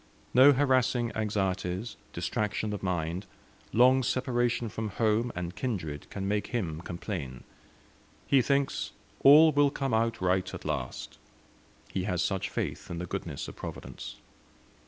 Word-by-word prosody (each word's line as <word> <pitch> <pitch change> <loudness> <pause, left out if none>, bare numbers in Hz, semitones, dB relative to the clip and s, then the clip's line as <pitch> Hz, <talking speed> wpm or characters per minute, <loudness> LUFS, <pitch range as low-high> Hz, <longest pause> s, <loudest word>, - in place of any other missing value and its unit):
No 130 +4 +8
harassing 130 -4 +2
anxieties, 100 -1 -1 0.2
distraction 105 0 -2
of 105 - -4
mind, 90 -1 -2 0.4
long 130 +3 +5
separation 120 -2 0
from 110 +1 -4
home 110 +3 +1
and 90 0 -4
kindred, 85 - -4
can 95 -1 -4
make 105 +1 0
him 85 -10 -3
complain. 85 - -5 0.8
He 135 -2 +4
thinks 140 - 0 0.3
"all 155 +3 +8
will 145 -1 +4
come 135 -3 -2
out 115 0 +1
right 95 0 +1
at 95 - -9
last;" 75 -5 -4 0.7
he 95 - -2
has 90 -3 0
such 100 -1 -1
faith - - -4
in 85 - -4
the 90 - -3
goodness - - -5
of - - -9
Providence. - - -7
105 Hz, 135 wpm, -29 LUFS, 90-125 Hz, 0.8 s, No